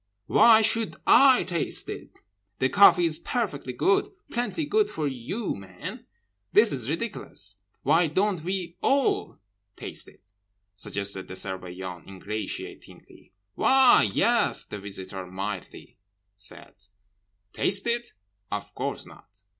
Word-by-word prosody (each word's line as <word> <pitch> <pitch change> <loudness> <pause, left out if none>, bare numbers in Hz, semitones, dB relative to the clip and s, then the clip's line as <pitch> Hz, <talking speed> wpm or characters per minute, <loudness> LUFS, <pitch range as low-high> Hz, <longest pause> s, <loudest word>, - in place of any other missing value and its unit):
Why 225 - +6
should 225 0 +3
I 270 -2 +7
taste 170 -3 -2
it? - - -7 0.5
The 130 - +1
coffee 195 -2 +6
is 160 -2 +1
perfectly 185 - -3
good, 195 - +2 0.2
plenty 245 +6 -2
good 425 +6 +2
for 155 -2 -2
you 140 - -3
men. 95 -2 -9 0.5
This 215 +1 +6
is 125 -3 -2
ridiculous—'—'Why 145 - -2
don't 185 +1 0
we 180 -1 -3
all 275 0 +1 0.4
taste - - -6
it?' - - -23 0.5
suggested 100 -1 -4
the 95 - -8
Surveillant 90 -2 -6
ingratiatingly.—'Why, 105 - 0
yes,' 235 0 +2
said - - -14
the 105 - -5
Visitor 95 -1 -6
mildly.—'Taste 95 +1 -7 1.9
it? 235 0 -2 0.4
Of - - -5
course - - -4
not. 100 0 -17
145 Hz, 110 wpm, -26 LUFS, -, 1.9 s, I